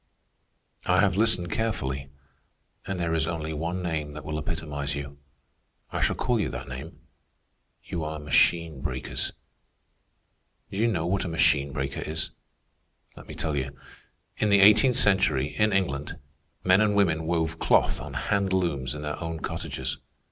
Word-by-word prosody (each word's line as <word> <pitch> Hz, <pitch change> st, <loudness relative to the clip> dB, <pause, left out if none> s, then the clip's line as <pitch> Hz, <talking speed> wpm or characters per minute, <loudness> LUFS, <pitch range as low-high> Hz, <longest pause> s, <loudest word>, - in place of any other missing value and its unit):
"I 90 Hz, 0 st, +4 dB
have 95 Hz, -3 st, +3 dB
listened 100 Hz, -5 st, +2 dB
carefully, 70 Hz, -12 st, -2 dB, 0.8 s
and 95 Hz, -2 st, -3 dB
there 85 Hz, -1 st, 0 dB
is 80 Hz, -1 st, +1 dB
only 80 Hz, -2 st, -3 dB
one 85 Hz, +4 st, -3 dB
name 80 Hz, -3 st, -2 dB
that 75 Hz, -1 st, -8 dB
will 75 Hz, 0 st, -2 dB
epitomize 75 Hz, -2 st, -3 dB
you. 70 Hz, 0 st, -6 dB, 0.7 s
I -, -, -2 dB
shall -, -, +2 dB
call 125 Hz, -3 st, +1 dB
you 105 Hz, -, 0 dB
that -, -, -6 dB
name. 70 Hz, +5 st, -8 dB, 0.8 s
You 85 Hz, -, -4 dB
are 75 Hz, 0 st, -3 dB
machine 75 Hz, 0 st, +2 dB
breakers. 65 Hz, -3 st, -3 dB, 1.4 s
Do 95 Hz, -, -5 dB
you 115 Hz, +3 st, +3 dB
know 85 Hz, -8 st, 0 dB
what 95 Hz, +2 st, 0 dB
a -, -, -3 dB
machine 75 Hz, -4 st, +3 dB
breaker 70 Hz, -1 st, -3 dB
is? 80 Hz, +1 st, -3 dB, 0.8 s
Let -, -, -12 dB
me -, -, -8 dB
tell 75 Hz, -2 st, -1 dB
you. 70 Hz, 0 st, -3 dB, 0.6 s
In 105 Hz, -, +1 dB
the 100 Hz, -1 st, +6 dB
eighteenth 110 Hz, +5 st, +7 dB
century, 95 Hz, -, +3 dB
in 105 Hz, 0 st, +3 dB
England, 85 Hz, -7 st, -1 dB, 0.5 s
men 95 Hz, +2 st, +5 dB
and 105 Hz, -1 st, +3 dB
women 80 Hz, -6 st, +2 dB
wove 80 Hz, -1 st, 0 dB
cloth -, -, +3 dB
on -, -, -7 dB
hand 100 Hz, -2 st, 0 dB
looms 75 Hz, -8 st, 0 dB
in 75 Hz, -, -6 dB
their 75 Hz, +3 st, -4 dB
own 80 Hz, -1 st, -4 dB
cottages. 65 Hz, -4 st, -4 dB
80 Hz, 160 wpm, -27 LUFS, 75-95 Hz, 1.4 s, eighteenth